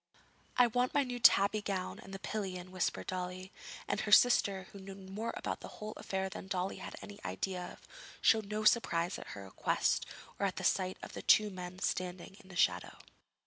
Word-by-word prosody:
'I 250 - +8
want 245 +2 +1
my 285 - +5
new 245 -2 -4
tabby 210 -2 +6
gown 195 -3 -3
and 195 - -11
the 195 - -5
pillion,' 185 -3 -4
whispered 185 -1 -1
Dolly; 185 +1 -4 0.4
and - - 0
her 210 - -3
sister, 205 -4 +6
who 200 - -10
knew 195 0 -8
more 195 +4 -5
about - - -3
the - - -8
whole 215 0 -5
affair 190 0 -2
than 190 - -8
Dolly 190 0 -2
had - - -7
any 205 0 -9
idea 185 -2 -3
of, - - -18 0.3
showed 220 -2 +4
no 215 0 -2
surprise 180 -6 +3
at - - -8
her 100 - -7
request 95 - 0 0.3
or 200 - +2
at 185 - -4
the 190 - -5
sight 185 0 +1
of - - -8
the - - -5
two 215 -1 +5
men 180 -1 -7
standing 185 0 -3
in 190 -3 -17
the 185 - -10
shadow. 185 - +1
195 Hz, 200 wpm, -34 LUFS, 185-215 Hz, 0.4 s, I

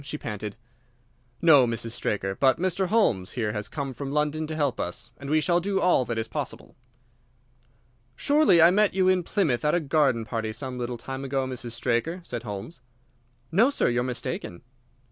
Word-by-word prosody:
she 145 +2 -5
panted. 105 -5 -6 0.9
"No, 145 -7 +7
Mrs. 115 0 -2
Straker. 100 -4 -2
But 130 +4 +3
Mr. 185 +1 0
Holmes 115 - +1
here 110 -4 -1
has 105 0 -4
come 140 -1 -4
from 135 +2 -6
London 150 +1 0
to 155 - -4
help 145 -4 0
us, - - -4
and 140 - -7
we 155 +1 +3
shall 175 +2 +2
do 195 +2 -1
all 180 -9 +3
that 115 0 -3
is 110 0 -2
possible." 110 - -6 1.4
"Surely 285 - +4
I 170 - +7
met 205 0 +2
you 190 -1 +3
in 185 -1 +4
Plymouth 170 - 0
at 150 +2 +2
a - - +3
garden 135 -6 +1
party 110 -2 -3
some 125 +1 -6
little 120 0 -3
time 135 +3 -6
ago, 135 0 -1
Mrs. 125 -2 -6
Straker?" 120 +9 -1
said 120 -8 -5
Holmes. 105 +5 -7 0.7
"No, 225 +10 +4
sir; 285 - +1
you 120 0 +1
are - - +1
mistaken." 120 -7 -5
135 Hz, 185 wpm, -26 LUFS, 115-170 Hz, 1.4 s, No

